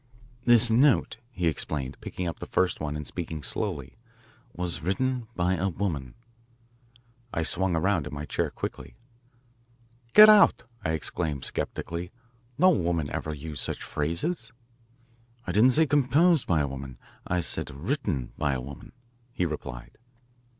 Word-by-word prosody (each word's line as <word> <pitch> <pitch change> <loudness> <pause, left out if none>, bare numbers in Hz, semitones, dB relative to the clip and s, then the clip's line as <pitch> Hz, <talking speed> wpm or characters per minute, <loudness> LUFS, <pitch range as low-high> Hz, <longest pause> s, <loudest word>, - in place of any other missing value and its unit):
"This 120 -1 +6
note," 130 0 +3
he 90 -9 -3
explained, 75 -4 -2
picking 90 - -4
up 85 - -5
the - - -7
first 95 -1 +1
one 75 -1 -3
and 75 0 -5
speaking 80 -3 -5
slowly, 75 - -3 0.5
"was 90 -4 -4
written 125 +7 -1
by 90 +1 +1
a 95 +2 0
woman." 80 -9 -3 1.2
I 80 - -1
swung 95 +2 0
around 80 -2 +1
in 75 - -8
my 75 +1 -5
chair - - -1
quickly. - - -6 1.2
"Get 215 0 +11
out!" 210 - +6 0.2
I 80 - 0
exclaimed 75 -2 -2
sceptically. 85 +1 -4 0.5
"No 185 +1 +6
woman 85 - 0
ever 75 - -3
used 75 -2 -6
such - - -4
phrases. 85 - -2 0.9
"I - - -2
didn't 125 +5 +5
say 160 +3 +4
composed 145 +3 +3
by 80 -4 +3
a 70 - 0
woman 65 -2 -7 0.3
I 90 0 +1
said 75 - 0
written 80 - -3
by 75 -2 +1
a 65 - -2
woman," 70 +2 -10 0.4
he 90 - 0
replied. - - -6
85 Hz, 145 wpm, -27 LUFS, 75-110 Hz, 1.2 s, Get